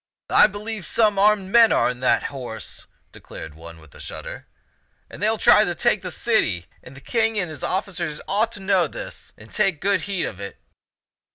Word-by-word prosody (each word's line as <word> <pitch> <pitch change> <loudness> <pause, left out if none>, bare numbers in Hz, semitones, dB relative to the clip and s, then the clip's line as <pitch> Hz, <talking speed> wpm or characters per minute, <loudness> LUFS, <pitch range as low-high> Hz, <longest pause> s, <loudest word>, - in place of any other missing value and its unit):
" - - -70
I - - +7
believe 210 -1 -6
some 210 -3 +2
armed 200 -2 +3
men 230 0 +7
are - - +3
in 125 0 -3
that 130 - +2
horse," 125 -5 -7 0.2
declared 80 -2 -10
one 85 +1 -12
with 80 -2 -18
a - - -15
shudder, - - -8 0.3
" - - -43
and - - -10
they 210 - +3
will 220 - 0
try 210 - +6
to 175 -4 -2
take 225 -2 +1
the 185 - -5
city; 155 - 0 0.2
the 135 +1 -13
King 225 - 0
and 180 -5 -1
his 150 - -9
officers 180 -5 -3
ought 215 +4 +1
to - - -8
know 190 -3 +2
this - - -9
and 110 - -15
take 175 -6 +1
good 200 +4 +1
heed 195 -3 -1
of 100 - -7
it." 100 0 -8
190 Hz, 205 wpm, -22 LUFS, 130-210 Hz, 0.3 s, I